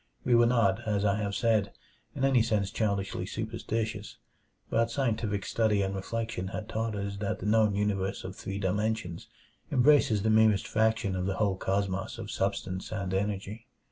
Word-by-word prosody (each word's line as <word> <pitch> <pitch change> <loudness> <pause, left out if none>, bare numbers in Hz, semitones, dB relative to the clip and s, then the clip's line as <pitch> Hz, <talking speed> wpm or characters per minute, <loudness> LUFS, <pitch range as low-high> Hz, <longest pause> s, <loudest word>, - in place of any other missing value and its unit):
We 125 - +3
were 120 0 +6
not, 115 -3 +2
as 105 -1 +1
I 100 0 +2
have 100 -1 -2
said, 110 -4 +1 0.4
in 135 - +1
any 135 -3 +4
sense 105 -4 0
childishly 100 -3 -1
superstitious, 110 -1 -4 0.5
but 115 0 +1
scientific 110 -5 -1
study 105 -3 +2
and 95 0 -2
reflection 110 0 -3
had 105 +2 -5
taught 110 0 -2
us 100 0 -4
that 100 0 -2
the - - -8
known 105 -1 +3
universe 100 -2 -1
of 95 0 -6
three 95 0 -5
dimensions 100 -2 -2 0.4
embraces 125 -6 +4
the 110 - +2
merest 110 -2 +4
fraction 110 -2 +1
of 90 0 -1
the 95 - -1
whole 100 -2 +1
cosmos 95 0 -2
of - - -6
substance 95 -1 -2
and 100 -3 -3
energy. 105 +3 -3
105 Hz, 170 wpm, -29 LUFS, 95-110 Hz, 0.5 s, were